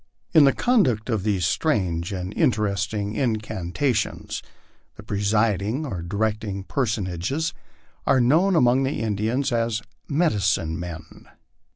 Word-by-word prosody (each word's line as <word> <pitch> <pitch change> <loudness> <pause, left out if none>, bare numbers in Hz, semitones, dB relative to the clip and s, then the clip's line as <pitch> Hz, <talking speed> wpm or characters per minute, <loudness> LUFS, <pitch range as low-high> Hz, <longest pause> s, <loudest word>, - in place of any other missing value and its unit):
In 155 -4 +8
the 135 - +6
conduct 130 - +2
of 110 -3 0
these 100 -4 0
strange 85 - 0
and 95 0 -4
interesting 105 -2 0
incanta 110 0 -1
tions, 105 -1 -3 0.5
the - - -11
presiding 105 - 0
or 95 - -4
directing 105 +2 -2
personages 110 - -1 0.5
are 130 - +4
known 165 +10 +4
among 125 -3 +4
the 135 +2 -1
Indians 110 +6 0
as 115 -1 0 0.2
* - - -44
medicine 100 - +1
men." 80 -2 -8
110 Hz, 120 wpm, -24 LUFS, 95-130 Hz, 0.5 s, In